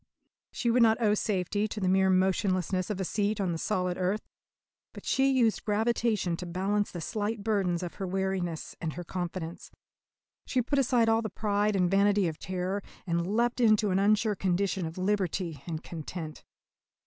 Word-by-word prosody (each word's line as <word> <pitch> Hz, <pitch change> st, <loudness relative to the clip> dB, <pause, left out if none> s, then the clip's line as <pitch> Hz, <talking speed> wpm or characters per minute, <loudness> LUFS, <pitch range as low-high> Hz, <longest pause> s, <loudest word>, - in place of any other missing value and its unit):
She 235 Hz, -, 0 dB
would 245 Hz, +1 st, +4 dB
not 225 Hz, 0 st, +5 dB
owe 215 Hz, -3 st, +3 dB
safety 205 Hz, 0 st, 0 dB
to 215 Hz, -, -5 dB
the 190 Hz, -, 0 dB
mere 190 Hz, +1 st, +4 dB
motionlessness 185 Hz, -1 st, +1 dB
of 205 Hz, -3 st, -3 dB
a 190 Hz, -, -1 dB
seat 210 Hz, +2 st, 0 dB
on 190 Hz, -3 st, 0 dB
the 165 Hz, -, -3 dB
solid 180 Hz, -2 st, -1 dB
earth, 185 Hz, +4 st, 0 dB, 0.7 s
but -, -, -11 dB
she 270 Hz, 0 st, +3 dB
used 245 Hz, -5 st, +2 dB
gravitation 215 Hz, -3 st, +1 dB
to 180 Hz, -, -6 dB
balance 195 Hz, +4 st, 0 dB
the 175 Hz, -, -6 dB
slight 210 Hz, +3 st, -2 dB
burdens 190 Hz, -5 st, 0 dB
of 175 Hz, -, -5 dB
her 190 Hz, -, -1 dB
wariness 185 Hz, -3 st, -2 dB
and 160 Hz, -3 st, -2 dB
her 175 Hz, -, -6 dB
confidence. 175 Hz, -1 st, -5 dB, 0.8 s
She 255 Hz, -2 st, +1 dB
put 280 Hz, +3 st, +1 dB
aside 245 Hz, -3 st, +3 dB
all 225 Hz, 0 st, +3 dB
the 220 Hz, -, -3 dB
pride 205 Hz, +1 st, 0 dB
and 180 Hz, -2 st, +3 dB
vanity 200 Hz, 0 st, +3 dB
of 160 Hz, -2 st, -5 dB
terror, 185 Hz, +2 st, -2 dB, 0.2 s
and 170 Hz, 0 st, 0 dB
leapt 240 Hz, +2 st, +1 dB
into 215 Hz, -3 st, +4 dB
an 185 Hz, -, +2 dB
unsure 210 Hz, +2 st, +3 dB
condition 190 Hz, -1 st, 0 dB
of 160 Hz, -, -9 dB
liberty 185 Hz, -5 st, -1 dB
and 160 Hz, -2 st, -4 dB
content. 160 Hz, -1 st, -7 dB
195 Hz, 180 wpm, -29 LUFS, 180-215 Hz, 0.8 s, not